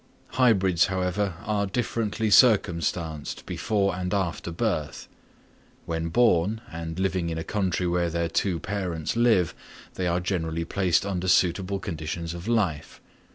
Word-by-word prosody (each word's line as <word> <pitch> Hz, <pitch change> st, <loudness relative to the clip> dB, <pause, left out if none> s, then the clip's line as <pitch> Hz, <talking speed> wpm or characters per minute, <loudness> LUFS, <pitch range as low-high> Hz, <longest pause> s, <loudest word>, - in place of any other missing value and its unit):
Hybrids, 95 Hz, -9 st, +3 dB
however, 95 Hz, 0 st, -1 dB
are 105 Hz, -1 st, 0 dB
differently 110 Hz, 0 st, -1 dB
circumstanced 85 Hz, -, +2 dB
before 100 Hz, -4 st, 0 dB
and 90 Hz, +2 st, -2 dB
after 90 Hz, -3 st, -2 dB
birth: 80 Hz, -6 st, -2 dB, 0.8 s
when 80 Hz, 0 st, -2 dB
born 105 Hz, 0 st, +3 dB
and 80 Hz, 0 st, -6 dB
living 95 Hz, -3 st, 0 dB
in 80 Hz, -, -3 dB
a 80 Hz, -, -3 dB
country 95 Hz, -3 st, -1 dB
where 85 Hz, 0 st, +1 dB
their 85 Hz, 0 st, -1 dB
two 85 Hz, +1 st, 0 dB
parents 90 Hz, -5 st, -3 dB
live, 115 Hz, -7 st, +3 dB, 0.4 s
they 90 Hz, -, -2 dB
are 85 Hz, +1 st, +1 dB
generally 85 Hz, -3 st, -2 dB
placed 95 Hz, 0 st, +1 dB
under 95 Hz, -2 st, -2 dB
suitable 90 Hz, +2 st, +2 dB
conditions 85 Hz, -2 st, -5 dB
of 85 Hz, +3 st, -8 dB
life. 100 Hz, -11 st, -1 dB
90 Hz, 135 wpm, -26 LUFS, 85-100 Hz, 0.8 s, Hybrids